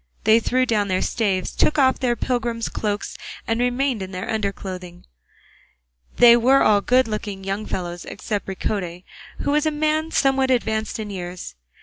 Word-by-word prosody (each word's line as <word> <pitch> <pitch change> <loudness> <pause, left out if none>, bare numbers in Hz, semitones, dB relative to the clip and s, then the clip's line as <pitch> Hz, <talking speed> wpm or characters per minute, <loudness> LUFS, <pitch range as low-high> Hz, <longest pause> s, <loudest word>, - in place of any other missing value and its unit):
They 220 +2 +5
threw 255 +3 +1
down 215 -4 +1
their 185 -1 0
staves, 195 -6 -1
took 305 - +2
off 260 -2 +3
their 245 -2 +1
pilgrim's 235 -1 -2
cloaks 205 -1 -3 0.3
and 225 +1 -1
remained 245 -1 0
in 190 - -5
their 185 0 -5
under 215 -3 -1
clothing; 180 -3 -9 1.1
they 235 -1 +8
were 255 +3 +4
all 205 -1 +4
good 255 +3 +3
looking 210 -3 -5
young 195 +2 -3
fellows, 175 -1 -4
except 205 -2 -4
Ricote, 185 -2 -3 0.4
who - - 0
was 300 +1 +2
a - - +4
man 310 +1 0
somewhat 270 -3 +2
advanced 220 -3 0
in 215 -2 -5
years. 180 -2 -6
220 Hz, 170 wpm, -22 LUFS, 195-255 Hz, 1.1 s, they